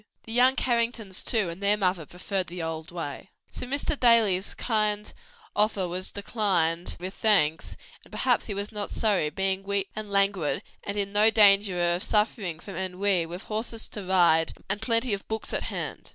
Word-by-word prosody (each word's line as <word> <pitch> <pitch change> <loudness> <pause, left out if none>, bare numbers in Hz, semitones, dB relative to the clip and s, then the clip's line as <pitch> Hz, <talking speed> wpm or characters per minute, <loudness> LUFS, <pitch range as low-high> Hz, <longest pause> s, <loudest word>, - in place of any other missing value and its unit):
The 225 - -9
young 250 +2 +5
Carringtons 235 -6 -1
too, 210 -7 0
and 170 +4 -11
their 200 +1 +3
mother 180 -6 0
preferred 185 +1 -3
the 175 0 -6
old 160 0 -5
way. 170 +1 -6 0.2
So - - -6
Mr. 280 +3 -1
Daly's 220 -6 +4
kind 215 -2 -1 0.4
offer 210 -3 +1
was 185 +2 -4
declined 185 -5 0
with 185 +2 -6
thanks: 175 -9 +1 0.3
and - - -19
perhaps 250 -3 +1
he 205 - -4
was 200 +2 -4
not 210 -2 -4
sorry; 200 -8 0
being 190 +4 -1
weak 200 0 -2
and 215 -1 -5
languid 195 -5 +1 0.2
and 200 0 -4
in 200 0 -2
no 210 +2 +5
danger 200 -3 +5
of 175 - -2
suffering 210 -6 0
from 190 0 -9
ennui 185 -1 0
with 175 +5 -8
horses 220 +1 -4
to 210 - -6
ride 175 -3 +3
and 205 +2 -2
plenty 230 0 +2
of 200 - -5
books 220 0 -4
at - - 0
hand. - - -6
200 Hz, 180 wpm, -26 LUFS, 180-215 Hz, 0.4 s, young